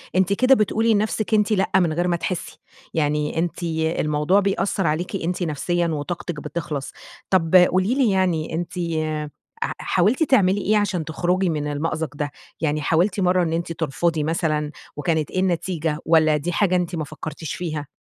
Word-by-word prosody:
أنتِ 190 +1 +3
كده 255 +6 +5
بتقولي 225 0 +2
لنفسِك 215 +1 0
أنتِ 210 0 +3
لأ 195 -3 +1
من 175 -4 +3
غير 175 +3 0
ما 175 - +2
تحسي. 175 +1 -4 0.3
يعني 150 0 0
أنتِ 175 +1 -2 0.4
الموضوع 150 +5 +2
بيأثر 195 -2 0
عليكِ 165 +6 -1
أنتِ 180 0 -2
نفسيًا 170 +2 0
وطاقتِك 165 +1 -4
بتخلص. 150 -2 -4 0.4
طب 180 -2 +2
قولي 185 +5 +5
لي 265 -5 +3
يعني 180 -5 0
أنتِ 170 +1 -3 0.9
ح - - -2
حاولتِ 210 - +2
تعملي 205 -9 +3
إيه 215 +3 +2
عشان 195 -6 0
تخرجي 180 +4 0
من 150 -2 -2
المأزق 155 +1 -2
ده 145 0 -3 0.3
يعني 155 -1 0
حاولتِ 175 +7 +1
مرة 180 -1 +3
إن 165 -1 -1
أنتِ 170 0 -2
ترفضي 160 0 -1
مثلًا 155 -2 -1 0.2
وكانت 155 0 -1
إيه 185 - -1
النتيجة، 170 -4 -1
والّا 155 -2 +4
دي 150 +4 -3
حاجة 185 +1 +2
أنتِ 180 -1 -1
ما 160 - -2
فكرتيش 155 +1 -6
فيها؟ 155 -5 -4
170 Hz, 165 wpm, -22 LUFS, 155-190 Hz, 0.9 s, كده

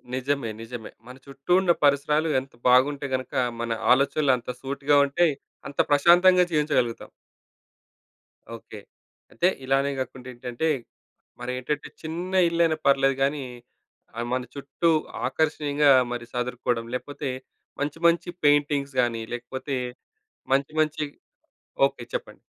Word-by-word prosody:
నిజమే 130 -2 -1
నిజమే. 115 -1 -8 0.2
మన 125 - -10
చుట్టూ 140 +3 -8
ఉన్న 175 -2 +3
పరిసరాలు 150 +3 +3
ఎంత 135 +1 -12 0.2
బాగుంటే 140 +3 +3
గనక 130 -1 -6 0.3
మన 120 0 -3 0.2
ఆలోచనలు 140 +1 +2
అంత 120 - -10
సూటిగా 140 +1 +1
ఉంటయి. 155 +2 +2 0.3
అంత 140 - -10
ప్రశాంతంగా 175 +5 +6
జీవించగలుగుతాం. 145 -7 0 1.5
ఓకే. 110 -1 -11 0.5
అయితే 180 - +2 0.2
ఇలానే 135 +1 +1
కాకుండా 130 -1 -6
ఏంటంటే, 120 +6 -3 0.7
మరి 125 +1 -4
ఏంటంటే 145 +3 -3
చిన్న 175 +4 -5 0.2
ఇల్లైనా 170 -2 +2
పర్లేదు 135 0 +4
గాని, 140 0 0 0.7
ఆహ్, 120 0 -3
మన 130 - 0
చుట్టూ 140 +4 -1 0.4
ఆకర్షణీయంగా 150 0 +2 0.2
మరి 120 -1 -4
సదురుకోవడం 125 -1 -2
లేకపోతే 145 +2 -5 0.5
మంచి 145 +2 -2
మంచి 170 +1 +1 0.2
పెయింటింగ్స్ 145 -2 +2
గాని, 115 -2 -1
లేకపోతే 130 +3 -5 0.8
మంచి 140 +2 0
మంచి 155 0 0 0.8
ఓకే. 120 - -11
చెప్పండి. - - -6
140 Hz, 115 wpm, -25 LUFS, 125-150 Hz, 1.5 s, ప్రశాంతంగా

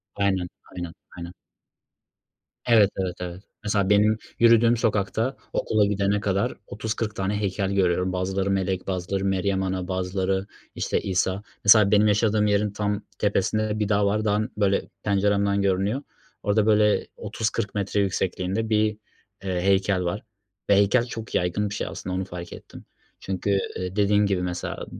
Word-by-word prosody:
Aynen, 95 -3 0 0.2
aynen, 90 -2 -6 0.2
aynen. 85 0 -7 1.4
Evet, 110 -4 +6
evet, 90 -2 -2
evet. 90 +1 -6 0.2
Mesela 100 -2 +1
benim 105 +1 +4 0.2
yürüdüğüm 115 0 +5
sokakta 110 +4 0 0.2
okula 110 -1 +2
gidene 100 0 +1
kadar 100 0 0
30-40 105 +1 -3
tane 95 +1 -1
heykel 100 -1 -1
görüyorum. 90 -1 +1
Bazıları 95 +1 -1
melek, 95 -1 -1
bazıları 95 +1 -2
Meryem 95 0 0
Ana, 95 -1 -2
bazıları, 95 +1 -1 0.3
işte, - - -1
İsa. 95 +1 0 0.2
Mesela 105 -1 +7
benim 105 0 +5
yaşadığım 105 0 +2
yerin 105 0 +1
tam 105 0 -2 0.2
tepesinde 105 +1 +1
de 105 +1 -2
bir 105 -1 0
dağ 100 -1 +3
var. 105 +2 0
Dağın, 110 +3 0
böyle, 100 -2 +1
penceremden 100 0 +2
görünüyor. 100 +7 0 0.4
Orada 105 0 +2
böyle 105 -1 +3
30-40 105 -2 -3
metre 100 0 -1
yüksekliğinde 95 +2 -1
bir, 110 -1 +3 0.6
eee, 90 -2 -1
heykel 95 0 +2
var 90 +5 -3 0.5
ve 100 - +6
heykel 100 +5 +3
çok 115 -2 -7
yaygın 90 +4 0
bir 105 - -5
şey - - -3
aslında 90 0 -5
onu 95 - -2
fark 90 -2 -8
ettim. - - -12 0.3
Çünkü, 95 +1 -3 0.3
eee, 90 +1 -4
dediğin 105 0 +3
gibi 95 -2 0
mesela 90 -1 -4
100 Hz, 150 wpm, -25 LUFS, 95-105 Hz, 1.4 s, Mesela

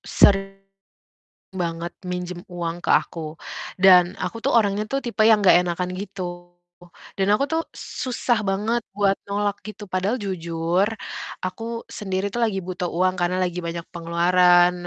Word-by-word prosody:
sering 195 0 +3 0.9
banget 170 -1 -3
minjem 180 0 -5
uang 175 0 -4
ke - - +1
aku, 160 -1 0 0.4
dan 180 -2 +6
aku 230 - -4
tuh - - +2
orangnya 205 -1 +2
tuh 275 - 0
tipe 235 -4 0
yang 220 -1 +6
nggak 195 -3 +6
enakan 180 +1 -2
gitu, 180 -3 -6 0.7
dan 195 0 +1
aku 275 +7 +2
tuh 325 +1 +1
susah 240 -2 -1
banget 210 +5 0
buat 200 -1 +3 0.2
nolak 205 0 -1
gitu. 215 0 -8
Padahal 190 +6 0
jujur, 170 -2 -1 0.6
aku 225 +5 -5
sendiri 190 -1 -3
tuh 240 0 0
lagi 200 -4 0
butuh 180 0 -3
uang 185 +2 +1
karena 175 +1 +1
lagi 180 0 -2
banyak 170 0 -4
pengeluaran. 175 +1 +4
185 Hz, 145 wpm, -23 LUFS, 175-205 Hz, 0.9 s, dan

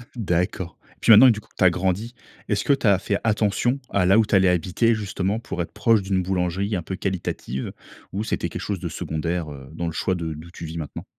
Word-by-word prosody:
D'accord. 90 -4 -1 0.2
Et - - -35
puis 115 - +5
maintenant, 125 +5 +10
du 110 -2 +2
coup, - - -18
que - - -33
tu - - +2
as 90 - +8
grandi. 95 +7 -1 0.4
Est-ce 105 -1 +1
que 140 - +4
tu 130 -5 0
as 100 -2 +5
fait 100 +1 -1
attention 110 +4 +1
à 95 -2 +2
là 95 +4 +5
où 110 - +4
tu 105 - +1
allais 95 -1 +5
habiter, 95 +6 +2
justement 100 0 -2
pour 90 - -4
être 85 - -5
proche 105 0 +3
d'une 95 -1 0
boulangerie 95 +2 -1
un 90 - -1
peu 95 +4 -5
qualitative 90 -9 -3 0.4
ou 100 +3 -2
c'était - - -2
quelque - - -6
chose 100 -4 -3
de 85 - -4
secondaire, 80 0 -3
heu, 65 -2 -10
dans 85 +1 -4
le 80 - -3
choix 95 +3 0
de 80 -2 -3
d'où 80 +3 -10
tu 85 - -8
vis 80 +1 -6
maintenant? 75 -3 -6
95 Hz, 245 wpm, -23 LUFS, 85-105 Hz, 0.4 s, maintenant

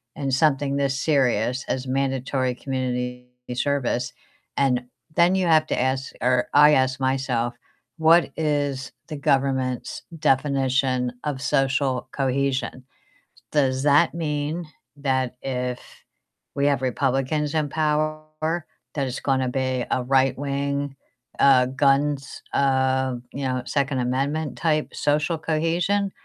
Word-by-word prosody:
in 140 -2 -3
something 140 0 +2
this 140 -1 0
serious 130 -4 +1
as 130 0 -2
mandatory 130 -1 0
community 125 -1 -3 0.3
service, 125 -2 -1 0.4
and 130 -3 +2 0.3
then 175 +2 +5
you 190 -1 +1
have 155 -2 +5
to - - -1
ask 130 +1 -1
or 125 +1 +2
I 150 +1 +7
ask 130 0 +1
myself, 130 -3 0 0.4
"What 165 +1 +5
is 145 -4 -1 0.2
the 155 - -5
government's 135 -3 0 0.2
definition 130 -3 +1
of 140 -3 -2
social 135 -2 +1
cohesion?" 135 -1 -1 0.7
Does 135 -3 +1
that 145 +3 +4
mean 155 +1 -2 0.3
that 130 -3 0
if 125 -1 -2 0.8
we 140 - +1
have 140 -3 +2
Republicans 135 +3 0
in 150 -2 +1
power, 155 +2 -1 0.3
that 140 - 0
it's 125 - -4
gonna 130 -2 +1
be 130 -1 -1
a 130 - +1
right-wing, 140 +2 0 0.4
uh, 130 -2 +6
guns, 140 +1 +1
uh, 130 -1 +2 0.2
you 140 - -4
know, 130 0 -1
Second 140 0 0
Amendment 140 +5 -1
type 155 -2 0
social 150 +3 +1
cohesion, 170 +6 0
135 Hz, 120 wpm, -24 LUFS, 130-150 Hz, 0.8 s, I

